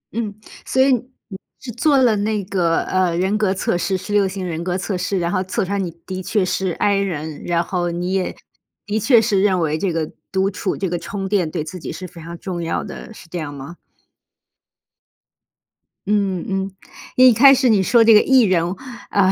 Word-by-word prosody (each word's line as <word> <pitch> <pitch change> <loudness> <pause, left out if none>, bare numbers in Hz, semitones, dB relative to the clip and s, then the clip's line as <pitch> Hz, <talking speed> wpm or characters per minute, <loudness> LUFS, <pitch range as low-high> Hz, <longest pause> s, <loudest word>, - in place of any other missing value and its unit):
嗯， 225 -3 -2 0.3
所 260 - -2
以 265 0 +5
你 245 -5 -6 0.2
是 245 - -7
做 275 +5 +2
了 240 -5 +4
那 210 0 -1
个， 175 -4 +1
呃， 185 -2 0
人 190 +3 +1
格 210 -3 +1
测 190 -2 -1
试， 190 +2 0
十 205 +3 -6
六 200 -2 +3
型 190 -1 -5
人 165 0 -4
格 180 0 -1
测 190 +1 -3
试， 185 +2 -1
然 170 -1 -1
后 185 -1 0
测 185 +1 -2
出 190 - -6
来 200 - 0
你 180 -3 -2 0.2
的 185 -1 -5
确 195 0 0
是 190 0 -1
I 200 -1 +1
人， 160 -6 -3
然 170 0 +1
后 175 -1 -2
你 175 +2 -3
也 190 -1 -1 0.5
的 210 +1 -1
确 235 +1 +5
是 210 -4 +1
认 190 -3 +2
为 155 -2 0
这 190 -1 0
个 160 -2 -2 0.2
独 190 +1 +1
处 190 0 -3
这 195 - -2
个 175 0 -2
充 195 +3 -5
电 190 -5 +1
对 155 - -3
自 180 +3 -8
己 - - -6
是 185 - -7
非 170 -1 -13
常 170 +1 -8
重 180 -2 -5
要 165 - -2
的， - - -9
是 215 - -13
这 175 +1 -5
样 150 -2 -5
吗？ 140 +6 -9 2.3
嗯， 200 -4 0
嗯， 195 0 -2 0.4
一 255 0 +7
开 270 +5 +7
始 260 -2 +3
你 205 -3 +4
说 230 +4 +4
这 225 0 +7
个 210 - +8
E 265 -1 +4
人， 185 -4 +3 0.5
啊， 190 -2 +3
190 Hz, 230 characters per minute, -20 LUFS, 175-210 Hz, 2.3 s, 个